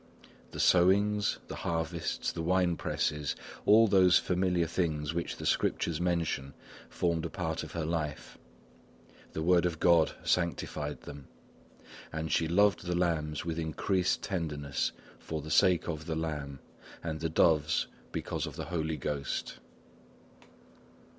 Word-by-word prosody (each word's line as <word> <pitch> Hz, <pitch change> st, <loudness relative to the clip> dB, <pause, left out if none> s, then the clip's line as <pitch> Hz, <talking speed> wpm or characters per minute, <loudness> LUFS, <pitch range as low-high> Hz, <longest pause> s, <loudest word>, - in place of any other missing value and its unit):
The -, -, -8 dB
sowings, 100 Hz, +3 st, +4 dB
the -, -, -6 dB
harvests, 85 Hz, 0 st, -2 dB
the -, -, -5 dB
wine 90 Hz, 0 st, +2 dB
presses, 75 Hz, -2 st, -1 dB, 0.3 s
all 110 Hz, +2 st, +7 dB
those 95 Hz, -3 st, +6 dB
familiar 90 Hz, -1 st, +1 dB
things 80 Hz, -3 st, -1 dB
which 85 Hz, 0 st, -3 dB
the -, -, -7 dB
Scriptures 85 Hz, 0 st, 0 dB
mention, 85 Hz, -6 st, -1 dB, 0.3 s
formed 85 Hz, -2 st, 0 dB
a 85 Hz, -, -3 dB
part 80 Hz, -1 st, -3 dB
of -, -, -8 dB
her 80 Hz, -2 st, -2 dB
life; 80 Hz, -3 st, -3 dB, 1.0 s
the 80 Hz, -, -2 dB
word 90 Hz, 0 st, +4 dB
of 85 Hz, -2 st, -4 dB
God 85 Hz, -3 st, +4 dB
sanctified 80 Hz, -4 st, -1 dB
them; 70 Hz, -2 st, -10 dB, 0.8 s
and 80 Hz, 0 st, -3 dB
she 80 Hz, -, +2 dB
loved 100 Hz, +2 st, +3 dB
the 90 Hz, -, 0 dB
lambs 80 Hz, -4 st, 0 dB
with 85 Hz, -1 st, -2 dB
increased 90 Hz, +4 st, 0 dB
tenderness 75 Hz, -7 st, -2 dB, 0.3 s
for 80 Hz, -, -5 dB
the 75 Hz, +1 st, -7 dB
sake 90 Hz, +1 st, +4 dB
of 80 Hz, -1 st, -4 dB
the 80 Hz, -, -1 dB
Lamb, 75 Hz, -4 st, -4 dB, 0.4 s
and 80 Hz, -2 st, -3 dB
the 80 Hz, -, -1 dB
doves 80 Hz, 0 st, +3 dB, 0.3 s
because -, -, -3 dB
of -, -, -8 dB
the -, -, -5 dB
Holy 80 Hz, -2 st, -2 dB
Ghost. 70 Hz, -2 st, -3 dB
85 Hz, 140 wpm, -31 LUFS, 80-90 Hz, 1.0 s, all